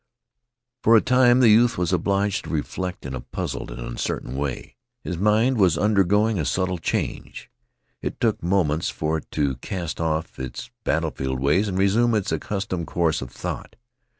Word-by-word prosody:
For 115 - +5
a - - +4
time 125 0 +4
the 120 - +7
youth 115 +3 +5
was 90 0 0
obliged 100 +2 0
to - - -8
reflect 90 +3 -3
in 65 - -5
a 65 - -4
puzzled 65 +1 -5
and - - -8
uncertain - - -4
way. 70 -1 -4 0.3
His 90 - -3
mind 110 +6 +2
was 90 -5 +4
undergoing 105 +2 +2
a 75 - -1
subtle 90 +1 -1
change. - - -3 0.5
It - - -4
took - - +1
moments 85 -3 +1
for 80 +1 -1
it - - -17
to 70 -4 0
cast 85 +4 -5
off 80 0 -2
its 65 - -6
battleful 75 -5 -1
ways 75 +11 +2
and 95 -2 -2
resume 110 +5 +3
its 105 -1 -1
accustomed 95 -4 -3
course 80 -2 0
of 65 - -6
thought. - - -6
90 Hz, 170 wpm, -24 LUFS, 75-105 Hz, 0.5 s, the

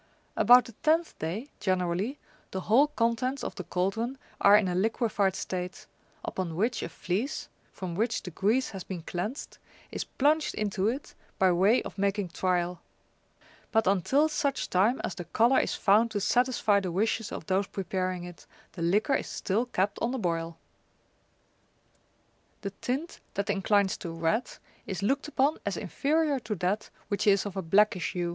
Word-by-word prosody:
About 245 -1 +7
the - - -10
tenth 325 +2 +2
day, 195 - -4
generally, 185 +6 0 0.3
the 190 - -4
whole 245 +10 +4
contents 255 0 0
of - - -3
the 185 - -6
cauldron 195 +9 -1 0.2
are 205 +1 +8
in 205 - +2
a 180 - -1
liquified 205 -1 +1
state, 180 -1 -4 0.4
upon 175 -4 -3
which 225 +6 0
a - - -4
fleece, 205 - -3 0.2
from 185 -2 -6
which 225 +6 -1
the 180 - -7
grease 215 +10 +1
has 190 -4 -6
been 180 -4 -6
cleansed, 205 - -5 0.3
is - - -3
plunged 300 +3 +1
into 205 -2 0
it 260 +6 -3 0.2
by 190 -1 +4
way 195 +8 +4
of - - -8
making 200 -1 0
trial; 180 0 -1 0.9
but 225 -1 +3
until 200 - +3
such 285 -3 -1
time 210 +8 +3
as - - -2
the 175 - -7
colour 235 +9 +3
is - - 0
found 215 +4 +4
to 215 -2 -2
satisfy 240 -2 +2
the 185 -3 -3
wishes 215 +4 0
of - - -6
those 195 0 +1
preparing 185 -2 -3
it, 175 -1 -11 0.2
the 175 - -8
liquor 205 - +2
is - - 0
still 220 +6 -1
kept 200 -4 -1
on 230 - +1
the 265 - -2
boil. 165 -5 -2 2.0
The 200 - -4
tint 265 - -4 0.2
that 200 0 0
inclines 200 0 +2
to 170 - -6
red 165 +9 0 0.4
is 190 0 -4
looked 275 +8 +1
upon 295 +1 +1
as - - -2
inferior 300 -1 0
to 215 -2 -4
that 190 +4 -1 0.2
which 205 0 -1
is 200 0 +4
of 200 -2 -5
a 190 - -1
blackish 190 +1 +2
hue. 175 -1 -1
200 Hz, 170 wpm, -28 LUFS, 185-240 Hz, 2.0 s, are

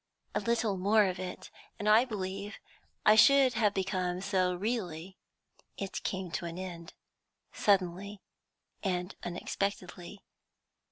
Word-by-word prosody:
A - - +1
little 230 -4 0
more 205 +3 +4
of 185 -1 -2
it 185 -1 -7 0.3
and 210 - -3
I 220 +4 +6
believe 200 -2 -5 0.5
I 215 - +8
should 270 +3 +6
have 215 -2 +2
become 185 -2 -1
so 185 -2 +1
really. 185 -4 -3 0.6
"It 195 -1 -4
came 185 -2 -3
to 170 - -3
an 170 0 -5
end, 175 -2 -7 0.6
suddenly 195 +1 +1 0.6
and 180 -1 -2
unexpectedly. 180 +1 -4
190 Hz, 120 wpm, -31 LUFS, 180-210 Hz, 0.6 s, I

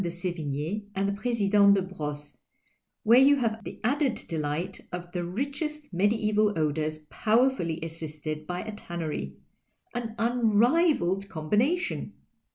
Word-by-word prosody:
do 175 - -1
Sevigne 175 +2 -3
and 195 +1 +1
the 200 - 0
President 200 -2 +4
de 195 - +2
Brosses, 150 -5 -6 0.7
where 235 +2 +7
you 280 +2 +7
have 225 -4 -1
the - - -8
added 270 +1 +2
delight 160 +3 -3
of 175 -1 -6
the 175 -1 -1
richest 285 - -4
medieval 210 +1 +2
odours 155 0 0
powerfully 225 -8 +2
assisted 155 -1 -5
by 180 0 -3
a 220 - -6
tannery 160 - -5 0.3
— - - -42
an 230 -2 -4
unrivalled 230 - +2
combination 230 - 0
200 Hz, 130 wpm, -28 LUFS, 165-235 Hz, 0.7 s, where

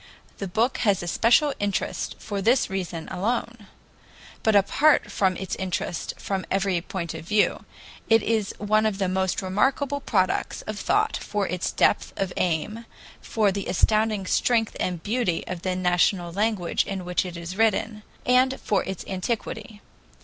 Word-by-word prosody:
The 195 - -3
book 230 +8 0
has 200 -5 +2
a - - -5
special 245 - +4
interest 205 -1 -2
for 205 -2 -4
this 240 +1 +3
reason 180 -4 -4
alone. 225 +2 -2 0.7
But 220 -1 +2
apart 275 +10 +4
from 190 -2 +1
its 190 - -4
interest 180 -2 -3
from 195 -1 -3
every 195 -3 +1
point 170 -2 -5
of - - -7
view, 210 +3 +1 0.4
it 225 -1 +5
is 220 -3 0
one 215 +1 +2
of 205 -3 -2
the 195 -2 0
most 190 0 0
remarkable 270 +9 +1
products 190 -9 0
of 215 -1 -5
thought 430 +1 +1
for 205 -2 -2
its 180 0 -2
depth - - +2
of 190 -2 -2
aim, 210 +7 -1 0.3
for 215 -3 +1
the 200 0 -4
astounding 215 +1 +2
strength 225 +3 +1
and 175 -3 -2
beauty 215 -6 0
of 180 -2 -5
the 185 0 -1
national 180 0 +2
language 205 -3 +1
in 190 -2 -4
which 180 0 0
it 180 -2 -7
is 170 +2 -6
written, 220 0 +1 0.2
and 255 +1 +3
for 205 - +1
its 190 -2 -5
antiquity. 215 +2 -4
200 Hz, 160 wpm, -25 LUFS, 185-225 Hz, 0.7 s, it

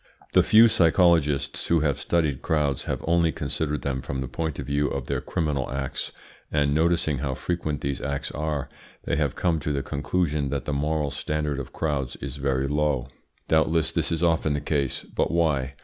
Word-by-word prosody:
The - - +7
few 115 +2 +7
psychologists 80 -7 +3
who 85 -2 +3
have 70 -3 +1
studied 80 -5 0
crowds 75 -5 0
have - - -3
only 85 -1 +3
considered 75 -1 -3
them 65 -2 -1
from 65 +1 -4
the 65 - -3
point 80 +3 -3
of - - -5
view 70 +1 +1
of 70 -3 -3
their 70 -2 -2
criminal 75 -3 -1
acts, 70 0 -3 0.4
and 70 -1 +2
noticing 80 -2 +2
how 65 -1 -2
frequent 80 -3 -2
these 70 -1 -2
acts 70 -1 -3
are, 75 -2 -2 0.4
they - - -1
have 75 -4 0
come 85 -3 +1
to 75 - -2
the 70 -1 -1
conclusion 75 -1 -1
that 70 -1 -3
the 75 - -2
moral 75 0 0
standard 75 0 -2
of 65 -1 -6
crowds 70 -5 -2
is 70 -1 -6
very 70 -1 0
low. 75 -3 0 0.4
Doubtless 80 0 +2
this - - 0
is 85 0 0
often 80 -3 +2
the 75 - 0
case; 70 -3 -1
but - - -1
why? 70 -6 +1
75 Hz, 190 wpm, -25 LUFS, 70-80 Hz, 0.4 s, The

